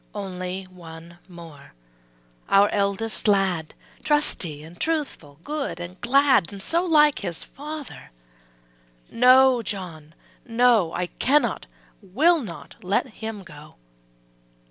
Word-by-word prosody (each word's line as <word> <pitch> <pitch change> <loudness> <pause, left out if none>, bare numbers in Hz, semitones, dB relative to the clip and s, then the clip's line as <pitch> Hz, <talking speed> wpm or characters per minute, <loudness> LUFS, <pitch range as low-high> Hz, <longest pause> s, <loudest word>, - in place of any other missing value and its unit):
Only 185 -1 -5
one 170 -2 -13
more, 165 - -14 0.7
our 200 +1 +5
eldest 205 +2 -1
lad, 190 -6 +1 0.3
Trusty 180 - 0
and 165 +3 -14
truthful, 290 - -3
good 295 - -4
and 175 +2 -9
glad 260 - +2
So 335 - 0
like 300 -4 +4
his 175 -5 -5
father. 300 0 -9 1.0
``No, 255 0 +5
John, 165 -7 -7 0.3
no 230 -7 +3
I 180 - -2
can 285 +2 +4
not, 225 - -4 0.3
will 320 - +3
not 185 -9 -10
let 195 +7 0
him 220 -3 -6
go.'' 150 -2 -14
200 Hz, 110 wpm, -23 LUFS, 170-265 Hz, 1.0 s, our